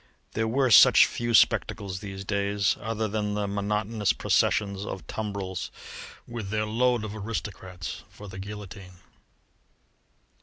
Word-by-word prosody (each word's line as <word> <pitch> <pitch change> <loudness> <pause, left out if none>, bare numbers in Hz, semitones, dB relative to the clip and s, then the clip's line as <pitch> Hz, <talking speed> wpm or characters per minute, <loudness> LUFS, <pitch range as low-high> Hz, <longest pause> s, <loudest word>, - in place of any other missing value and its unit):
There 110 0 -1
were 130 +2 +2
such - - +9
few 120 -1 -1
spectacles 95 -3 +2
these 100 -1 -7
days, 100 -1 +1
other 110 -1 -2
than 105 0 -2
the 105 -1 -1
monotonous 105 +1 0
processions 100 -2 +1
of 95 - -6
tumbrils 100 -4 -4 0.6
with 115 -4 -6
their 110 +1 0
load 120 +1 +1
of 110 0 -5
aristocrats 100 -4 -6
for 105 - -12
the 95 -1 -8
guillotine! 100 -2 -8
105 Hz, 125 wpm, -27 LUFS, 100-110 Hz, 0.6 s, such